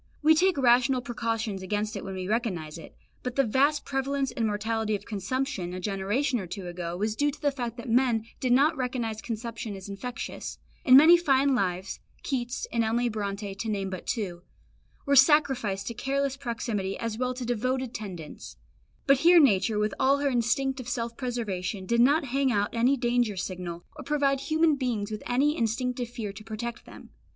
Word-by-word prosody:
We 315 Hz, +1 st, +7 dB
take 365 Hz, +1 st, +3 dB
rational 255 Hz, 0 st, +4 dB
precautions 225 Hz, -4 st, -3 dB
against 210 Hz, +3 st, -2 dB
it 200 Hz, -, -5 dB
when 195 Hz, 0 st, -6 dB
we 185 Hz, -1 st, -4 dB
recognise 185 Hz, -9 st, -2 dB
it, 160 Hz, -, -13 dB, 0.3 s
but 250 Hz, -1 st, -4 dB
the 275 Hz, -, +4 dB
vast 280 Hz, +6 st, +2 dB
prevalence 270 Hz, 0 st, -1 dB
and 230 Hz, -4 st, -1 dB
mortality 215 Hz, +1 st, -1 dB
of 200 Hz, -, -7 dB
consumption 210 Hz, -3 st, -3 dB
a -, -, -4 dB
generation 205 Hz, +8 st, -1 dB
or 190 Hz, -, -6 dB
two 190 Hz, +1 st, -6 dB
ago 175 Hz, 0 st, -5 dB
was 210 Hz, +2 st, -1 dB
due 290 Hz, +5 st, +2 dB
to 290 Hz, -, -7 dB
the 285 Hz, -, +1 dB
fact 240 Hz, -3 st, -5 dB
that 235 Hz, -, -8 dB
men 235 Hz, -2 st, +2 dB
did 255 Hz, -, 0 dB
not 285 Hz, +6 st, +4 dB
recognise 245 Hz, -5 st, -3 dB
consumption 230 Hz, -2 st, -5 dB
as 190 Hz, 0 st, -9 dB
infectious; 200 Hz, +5 st, -6 dB, 0.3 s
and 255 Hz, -1 st, +8 dB
many 325 Hz, +5 st, +8 dB
fine 280 Hz, -4 st, +3 dB
lives 185 Hz, -5 st, -1 dB, 0.2 s
Keats 250 Hz, -2 st, -2 dB
and 230 Hz, -1 st, +2 dB
Emily 235 Hz, +2 st, +1 dB
Bronte, 200 Hz, -2 st, -4 dB
to 220 Hz, +3 st, -4 dB
name 195 Hz, -2 st, -2 dB
but 185 Hz, -, -7 dB
two 190 Hz, -7 st, -3 dB, 0.6 s
were 280 Hz, -1 st, +3 dB
sacrificed 260 Hz, -8 st, +4 dB
to 235 Hz, -, -4 dB
careless 275 Hz, +3 st, -1 dB
proximity 230 Hz, -7 st, -3 dB
as 230 Hz, -1 st, -4 dB
well 255 Hz, 0 st, 0 dB
as -, -, -14 dB
to 250 Hz, -, -4 dB
devoted 255 Hz, +1 st, -1 dB
tendance; 180 Hz, -8 st, -8 dB, 0.5 s
but 275 Hz, 0 st, +5 dB
here 345 Hz, +3 st, +7 dB
nature, 220 Hz, -, +3 dB
with 210 Hz, -1 st, 0 dB
all 275 Hz, +1 st, +4 dB
her 285 Hz, 0 st, +1 dB
instinct 260 Hz, +3 st, 0 dB
of 245 Hz, -1 st, -6 dB
self 235 Hz, -1 st, -3 dB
preservation, 210 Hz, -7 st, -3 dB
did 235 Hz, +4 st, +2 dB
not 285 Hz, +5 st, +4 dB
hang 270 Hz, +1 st, +1 dB
out 205 Hz, -2 st, 0 dB
any 245 Hz, +4 st, +3 dB
danger 240 Hz, -4 st, +1 dB
signal, 180 Hz, -2 st, -5 dB
or -, -, -8 dB
provide 280 Hz, -1 st, +1 dB
human 315 Hz, +2 st, +2 dB
beings 235 Hz, -6 st, -2 dB
with 215 Hz, -, -4 dB
any 280 Hz, +5 st, +2 dB
instinctive 245 Hz, +1 st, -1 dB
fear 225 Hz, -5 st, -5 dB
to 210 Hz, +2 st, -10 dB
protect 230 Hz, +3 st, -6 dB
them. -, -, -13 dB
235 Hz, 190 wpm, -27 LUFS, 205-265 Hz, 0.6 s, and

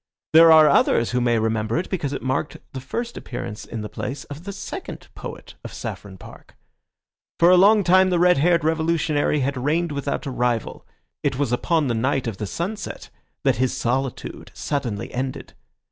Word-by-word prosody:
There 165 Hz, +1 st, +8 dB
are 155 Hz, -1 st, +8 dB
others 120 Hz, -4 st, +3 dB
who 125 Hz, 0 st, 0 dB
may 120 Hz, -1 st, +2 dB
remember 110 Hz, +1 st, 0 dB
it 175 Hz, -, -2 dB
because 155 Hz, -8 st, -3 dB
it 140 Hz, -, -5 dB
marked 130 Hz, +3 st, -2 dB, 0.2 s
the 130 Hz, -, -5 dB
first 235 Hz, -, -5 dB
appearance 120 Hz, -3 st, -6 dB
in 115 Hz, -2 st, -6 dB
the 105 Hz, -, -5 dB
place 135 Hz, +6 st, -5 dB
of 155 Hz, +5 st, -12 dB
the 200 Hz, -, -4 dB
second -, -, -7 dB
poet -, -, -9 dB
of -, -, -8 dB
Saffron 95 Hz, -2 st, -7 dB
Park. -, -, -14 dB, 0.8 s
For 170 Hz, +1 st, +6 dB
a -, -, +7 dB
long 205 Hz, +3 st, +6 dB
time 185 Hz, +1 st, +5 dB
the 180 Hz, -, +1 dB
red 180 Hz, -3 st, +4 dB
haired 170 Hz, +1 st, +3 dB
revolutionary 160 Hz, -2 st, +1 dB
had 130 Hz, -1 st, -2 dB
reigned 165 Hz, +3 st, 0 dB
without 140 Hz, 0 st, -3 dB
a 140 Hz, -, -3 dB
rival; 120 Hz, -2 st, -2 dB, 0.3 s
it 135 Hz, -3 st, -1 dB
was 140 Hz, -4 st, 0 dB
upon 155 Hz, +5 st, +1 dB
the 125 Hz, -, 0 dB
night 130 Hz, +4 st, 0 dB
of 110 Hz, -5 st, -4 dB
the 105 Hz, -, -4 dB
sunset 195 Hz, -, -5 dB, 0.3 s
that -, -, +2 dB
his 130 Hz, 0 st, 0 dB
solitude 130 Hz, +2 st, -3 dB
suddenly 120 Hz, -9 st, -3 dB
ended. 130 Hz, +1 st, -4 dB
140 Hz, 185 wpm, -23 LUFS, 125-170 Hz, 0.8 s, There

